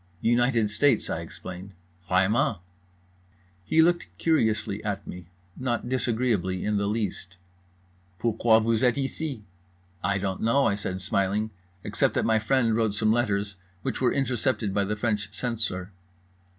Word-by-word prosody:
"United 120 -2 +3
States" 115 +2 +2
I 80 - -1
explained. 90 +3 -9 0.4
"Vraiment"—he 90 - -1
looked 175 +1 +2
curiously 110 -10 +1
at 100 -2 -3
me, 90 -2 -9 0.3
not 120 -2 -2
disagreeably 115 -7 0
in 105 0 +1
the 100 0 0
least. 100 -4 -3 0.8
"Pourquoi 115 +1 +3
vous 115 0 +1
êtes 125 -1 +3
ici?" 135 -3 -3 0.6
"I 100 +2 +1
don't 95 -1 -3
know" 115 +5 +3
I - - +3
said 95 -2 -4
smiling 100 +3 0
pleasantly, 95 -3 -32 0.2
"except - - +1
that - - +1
my 110 -1 +3
friend 115 0 +2
wrote 110 -3 +1
some 110 0 +2
letters 100 -4 0 0.3
which - - -3
were 125 - +3
intercepted 130 -5 0
by 100 0 +1
the 105 +2 -1
French 105 -2 -1
censor." 105 -4 -3
105 Hz, 140 wpm, -26 LUFS, 95-120 Hz, 0.8 s, United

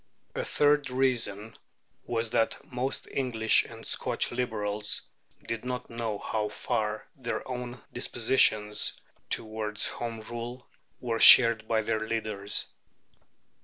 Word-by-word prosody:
A - - -3
third 145 -1 +2
reason 120 -5 0 0.5
was 115 -1 -2
that 115 - +1
most 130 +2 -3
English 115 -5 +2
and - - -11
Scotch - - -1
Liberals 105 -4 -2 0.4
did 115 0 -4
not 125 -1 -5
know 115 -3 -3
how 105 0 -3
far 105 0 -3
their 125 -4 -5
own 125 -1 -6
dispositions 110 -3 +3 0.4
towards 110 -1 -1
Home 115 -1 -5
Rule 120 +2 -7 0.3
were 115 -2 -3
shared 115 -3 +8
by 110 -1 +1
their 110 - -1
leaders. 110 -2 -2
115 Hz, 115 wpm, -28 LUFS, 110-125 Hz, 0.5 s, shared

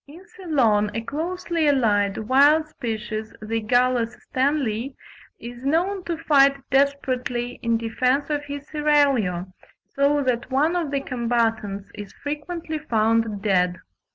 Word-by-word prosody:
In 335 +7 -14
Ceylon 240 - +1
a 225 - -1
closely 330 +4 -2
allied, 205 -8 +2
wild 285 +7 +4
species, 220 -5 -5
the 225 +1 -2
Gallus 245 0 +1 0.2
Stanleyi, 260 -2 0 0.4
is 240 +1 -9
known 355 +7 0
to 340 -2 -2
fight 280 -3 +4
desperately 255 -3 0
"in 230 -1 +1
defence 250 +6 0
of 290 -1 -2
his 285 0 -7
seraglio," 275 - +1 0.3
so 285 +1 +1
that 250 -1 -1
one 295 +6 +2
of 340 -4 -1
the 280 -1 -1
combatants 225 -6 -1
is 205 -2 -9
frequently 310 +2 -5
found 225 -6 0
dead. 180 -4 +2
255 Hz, 125 wpm, -23 LUFS, 225-295 Hz, 0.4 s, wild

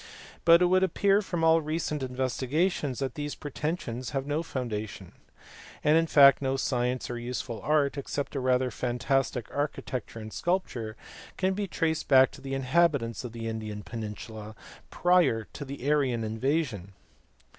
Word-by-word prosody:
But 170 +1 +7
it - - +6
would 185 +1 +4
appear 195 +2 +3
from 175 -5 -3
all 165 0 +5
recent 155 -1 -2
investigations 130 +3 -1
that 135 -1 -2
these 145 -2 -4
pretensions 145 -5 -4
have 135 - -2
no 145 +2 -1
foundation; 115 -9 -5 0.7
and 150 - +5
in 165 0 +3
fact 140 -3 +7
no 135 0 0
science 125 -1 -1
or 120 -1 -4
useful 120 -1 -4
art 145 -1 +1
(except 140 +1 -4
a - - 0
rather 130 0 +1
fantastic 125 +2 -1
architecture 140 -5 -3
and 110 -1 -8
sculpture) 125 -12 -2 0.4
can 190 0 +1
be 200 +1 -2
traced 160 -3 -1
back 130 -1 +6
to - - -13
the 135 0 -4
inhabitants 135 -4 +1
of 125 - -6
the 115 0 -5
Indian 110 -2 -5
peninsula 110 -1 -7 0.3
prior 175 -11 +3
to - - -6
the 140 -1 -6
Aryan 135 -6 +2
invasion. 110 - -1
135 Hz, 155 wpm, -28 LUFS, 120-155 Hz, 0.7 s, But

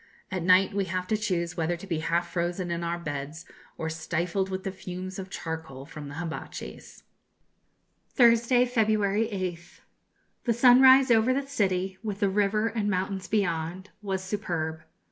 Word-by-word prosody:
At 185 -1 -2
night 185 +3 +4
we 200 -1 0
have 185 0 -3
to 220 - +2
choose 175 -5 -1
whether 170 +1 -1
to 175 - -10
be 170 -5 -2
half 170 +2 0
frozen 175 +1 -2
in 170 0 -2
our 170 0 -1
beds, 150 0 -6 0.3
or 160 - -3
stifled 170 +4 -2
with 190 0 -4
the 195 - -3
fumes 185 0 -7
of 190 0 -7
charcoal 160 -7 -6
from 150 -1 -9
the 145 - -8
hibatchis. 165 0 -7 1.1
Thursday, 240 0 +4
February 215 -3 +1
8th. 180 -3 -5 0.6
The 235 - +3
sunrise 260 +2 +7
over 230 +3 +4
the 275 0 -1
city, 190 -8 -1
with 210 -3 -4
the 200 -3 +2
river 205 +2 +1
and 220 -3 -1
mountains 190 0 -2
beyond, 180 -2 -1
was 190 -2 -3
superb. 165 -5 -3
190 Hz, 160 wpm, -27 LUFS, 170-210 Hz, 1.1 s, sunrise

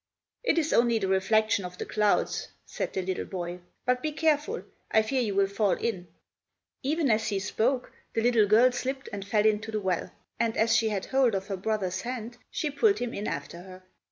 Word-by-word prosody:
"It 485 - +2
is 320 -2 +1
only 235 -1 +4
the 195 -3 -1
reflection 200 +2 +2
of 180 0 -7
the - - -4
clouds," 210 -1 +1 0.2
said - - -4
the 190 - -2
little 185 0 -2
boy. 175 -1 -5 0.3
"But 250 0 +2
be 310 - -1
careful. 310 +7 +1 0.3
I 220 - +4
fear 260 +4 0
you 210 -5 -1
will 195 0 +4
fall 200 0 +1
in." 190 -6 -2 0.7
Even 295 -1 +1
as 220 0 +2
he 205 -2 0
spoke 240 +7 0 0.2
the 225 - +1
little 230 -3 +4
girl 230 +5 +6
slipped 265 +2 -4
and 200 -1 -4
fell 210 +1 +1
into 215 0 +2
the 215 - -1
well, 185 -4 -1 0.3
and 230 -1 0
as 225 +1 +3
she 220 0 +3
had 200 -3 -2
hold 260 -5 +2
of 195 0 -2
her 195 - -2
brother's 190 -2 -1
hand 240 0 -5
she 300 - -2
pulled 400 +8 +3
him 245 -1 -3
in 205 - -4
after 170 - -5
her. 185 0 -12
220 Hz, 210 wpm, -28 LUFS, 195-250 Hz, 0.7 s, girl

